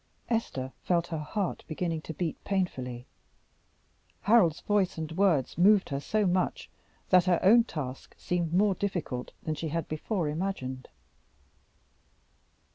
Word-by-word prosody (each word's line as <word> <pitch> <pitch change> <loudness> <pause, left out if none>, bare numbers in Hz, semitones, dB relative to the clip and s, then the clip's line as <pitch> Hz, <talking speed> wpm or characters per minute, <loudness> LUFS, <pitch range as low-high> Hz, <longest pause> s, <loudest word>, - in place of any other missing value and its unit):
Esther 135 - -2
felt 170 -1 +1
her 165 -2 -4
heart 180 +6 -3
beginning 165 0 -2
to 160 - -7
beat 160 +1 -4
painfully. 130 -11 -2 1.2
Harold's 200 -8 +4
voice 205 -4 +1
and 160 -1 -4
words 165 -5 +1
moved 200 +2 +5
her 140 - -2
so 215 +8 0
much 180 0 0 0.4
that 180 -1 +6
her 180 -2 +3
own 230 +5 +7
task 140 - -6
seemed 175 -2 -1
more 195 +3 +3
difficult 175 -11 -3
than 155 - -1
she 155 +2 -4
had 165 +2 -2
before 165 +2 -2
imagined. 150 -6 -3
170 Hz, 130 wpm, -29 LUFS, 150-195 Hz, 1.2 s, own